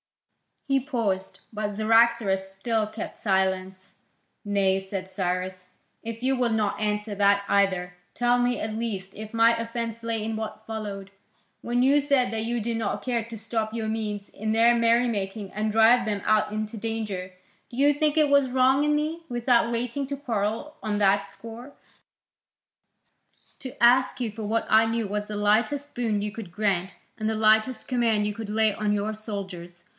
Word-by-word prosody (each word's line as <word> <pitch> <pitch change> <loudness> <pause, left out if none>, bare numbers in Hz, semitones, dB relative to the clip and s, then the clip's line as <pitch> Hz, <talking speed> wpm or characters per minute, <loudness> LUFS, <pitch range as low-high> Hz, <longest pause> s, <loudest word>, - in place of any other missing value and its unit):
He 275 -1 +3
paused, 230 -9 -2
but 210 -2 -3
Cyaxares 220 -3 +3
still 215 +3 -1
kept 215 +1 -7
silence. 190 -1 -1 0.5
"Nay," 195 -2 +2
said 190 -1 -6
Cyrus, 185 -1 -3 0.4
"if 230 +1 -7
you 265 +1 +2
will 250 -2 +1
not 215 -2 0
answer 210 0 -1
that 200 0 +3
either, 185 -3 +1 0.2
tell 245 +1 +2
me 245 0 +1
at 215 0 -3
least 200 -4 -4
if 215 +1 -9
my 230 0 +5
offence 230 0 -4
lay 230 -1 -2
in 220 0 -3
what 220 0 -6
followed, 205 -3 -6 0.5
when 245 +1 0
you 280 +3 +5
said 275 -4 +2
that 220 0 -2
you 240 0 -1
did 230 +1 -2
not 225 -3 -2
care 240 -3 -1
to 230 0 -8
stop 220 0 -3
your 225 -1 -3
Medes 210 -2 -3
in 215 +1 -3
their 230 +2 +5
merry 235 +1 +3
making 200 -2 -3
and 215 +1 -1
drive 230 +2 +5
them 205 -2 -2
out 215 -1 +2
into 215 +1 -4
danger, 210 -4 -4 0.4
do - - -11
you 285 +2 +5
think 300 +1 0
it 305 -2 +4
was 280 -2 +4
wrong 260 +2 +3
in 300 0 +2
me, 315 +3 -2
without 240 -1 +2
waiting 245 +4 -2
to 280 +1 -4
quarrel 235 +3 -3
on 210 -1 -2
that 200 0 +3
score, 230 +6 -11 1.9
to 255 -2 -7
ask 255 +2 +5
you 230 -3 -1
for 220 +1 -7
what 220 +2 0
I 220 +1 +6
knew 225 0 -1
was 205 +1 -3
the 210 - -6
lightest 235 +8 +1
boon 225 -4 -1
you 210 0 -3
could 210 -5 -8
grant 190 -2 -1 0.2
and 215 0 -1
the 220 - -1
lightest 220 +3 +2
command 230 -4 +1
you 210 - -1
could 220 -1 -7
lay 215 0 +2
on 210 0 0
your 210 +1 -1
soldiers? 190 -5 -7
220 Hz, 180 wpm, -26 LUFS, 205-235 Hz, 1.9 s, I